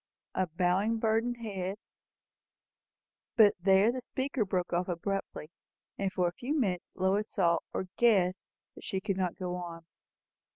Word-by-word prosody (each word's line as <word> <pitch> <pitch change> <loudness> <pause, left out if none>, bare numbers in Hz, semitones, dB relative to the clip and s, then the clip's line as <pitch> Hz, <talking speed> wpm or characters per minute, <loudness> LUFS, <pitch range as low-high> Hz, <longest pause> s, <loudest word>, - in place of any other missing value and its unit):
'A 185 - 0
bowing, 190 +5 +2
burdened 225 +2 +1
head 195 -4 -4 0.8
'" - - -63
But 210 -3 +7
here 195 +3 +5
the 255 +1 -4
speaker 260 -1 -2
broke 185 -3 -2
off 175 +1 +1
abruptly, 180 -2 -3 0.4
and 195 -1 -1
for 180 -3 +1
a - - -1
few 290 +9 -2
minutes 185 -8 -1
Lois 195 +3 +1
saw, 170 -4 +2
or 190 - -3
guessed, 195 -6 +3 0.3
that - - -13
she 190 - -2
could 195 0 -2
not 185 -2 -1
go 180 -1 -3
on. 170 -2 -7
190 Hz, 155 wpm, -31 LUFS, 180-220 Hz, 0.8 s, But